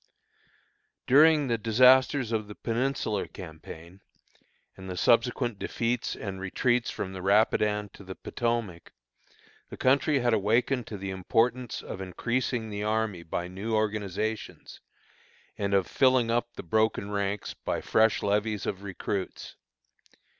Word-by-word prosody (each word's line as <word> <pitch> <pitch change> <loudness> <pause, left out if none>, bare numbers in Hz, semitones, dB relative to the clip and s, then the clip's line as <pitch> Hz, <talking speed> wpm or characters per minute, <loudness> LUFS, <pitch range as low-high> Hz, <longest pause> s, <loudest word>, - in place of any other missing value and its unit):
During 150 +2 +6
the 115 -3 0
disasters 125 +3 +4
of 110 -2 -1
the 105 - -9
Peninsular 115 -3 -1
campaign, 85 +1 -11 0.7
and 95 0 -10
the 90 - -5
subsequent 120 +1 +2
defeats 120 +1 -2
and 95 -2 -6
retreats 120 +5 0
from 95 -1 -5
the 95 - -6
Rapidan 105 +1 +2
to 100 - -14
the 95 0 -8
Potomac, 115 -8 -3 0.8
the - - -9
country 140 +3 +3
had 120 -2 +1
awakened 115 +4 +1
to 105 - -6
the 95 0 -5
importance 115 +6 0
of 95 - -7
increasing 115 +4 -2
the 105 0 -4
army 105 -3 -1
by 85 +1 -4
new 100 +5 -3
organizations, 110 0 -3 0.8
and 100 -1 0
of 95 -2 +3
filling 130 -1 +3
up 120 0 -1
the - - -7
broken 110 +2 0
ranks 100 0 -2
by - - -3
fresh 110 0 +2
levies 105 0 0
of 95 -1 -3
recruits. 95 -1 -5
110 Hz, 130 wpm, -28 LUFS, 95-120 Hz, 0.8 s, During